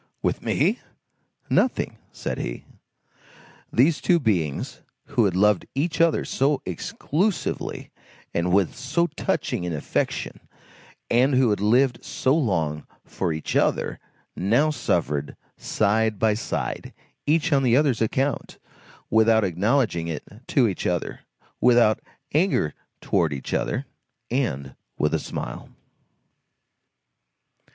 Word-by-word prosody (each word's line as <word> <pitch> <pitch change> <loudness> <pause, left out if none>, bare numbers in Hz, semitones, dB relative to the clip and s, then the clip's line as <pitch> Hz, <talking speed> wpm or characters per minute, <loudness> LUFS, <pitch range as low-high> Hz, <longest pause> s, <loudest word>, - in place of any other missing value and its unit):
"With - - 0
me? - - +1 0.7
Nothing," - - +1
said - - -4
he. - - -5 1.1
These 145 +6 +3
two 175 -2 +4
beings 90 - -1 0.2
who 115 - +2
had 95 -3 +1
loved 105 0 +3
each 160 +5 0
other 165 -1 +3
so 140 +1 +1
exclusively, 160 - -2 0.4
and 85 +1 0
with 95 -1 +3
so 140 +7 0
touching 170 - -2
an 90 -1 -2
affection, 75 - -2 0.7
and 130 +3 +4
who 125 -3 +4
had 105 - 0
lived 120 +3 +3
so 130 +2 +1
long 80 - 0 0.2
for 90 -3 -2
each 80 0 -4
other - - +1 0.4
now 120 +12 +2
suffered 75 - -1 0.2
side 110 +1 +1
by 110 +1 +3
side, 105 - -4 0.3
each 160 +1 +2
on 140 - +4
the 125 -2 +4
other's 140 -6 +2
account; 135 +5 -1 0.5
without 110 0 +5
acknowledging 95 -1 +1
it 80 -3 -4 0.2
to 125 -4 +3
each 95 - -2
other, 90 -2 -2 0.4
without 120 -3 +5 0.3
anger 155 - +2 0.3
towards 80 -4 +1
each 65 - -6
other, - - -1 0.5
and 70 - -1 0.2
with - - +1
a - - +2
smile. - - -6
110 Hz, 120 wpm, -24 LUFS, 90-135 Hz, 1.1 s, without